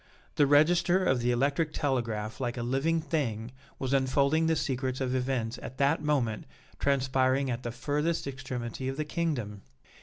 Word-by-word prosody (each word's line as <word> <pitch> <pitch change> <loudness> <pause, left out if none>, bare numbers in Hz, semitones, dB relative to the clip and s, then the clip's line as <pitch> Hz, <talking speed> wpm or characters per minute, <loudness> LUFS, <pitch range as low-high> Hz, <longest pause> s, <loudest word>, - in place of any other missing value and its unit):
The 145 - +3
register 175 +5 +4
of 130 -6 +3
the 120 +1 0
electric 140 +5 +1
telegraph 115 -5 -2
like 120 -1 -2
a 120 - -2
living 140 +7 +1
thing 125 -8 -2 0.3
was 135 0 -2
unfolding 140 +4 +2
the 160 - +3
secrets 130 -3 -2
of 130 -1 -1
events 125 -2 -1
at 130 - -8
that 140 +3 +2
moment 135 -8 0 0.3
transpiring 130 -1 +2
at 120 0 -3
the 120 - -4
furthest 150 +7 -1
extremity 130 -2 -5
of 135 +1 -3
the 155 - -1
Kingdom! 140 - -2
135 Hz, 160 wpm, -29 LUFS, 125-150 Hz, 0.3 s, register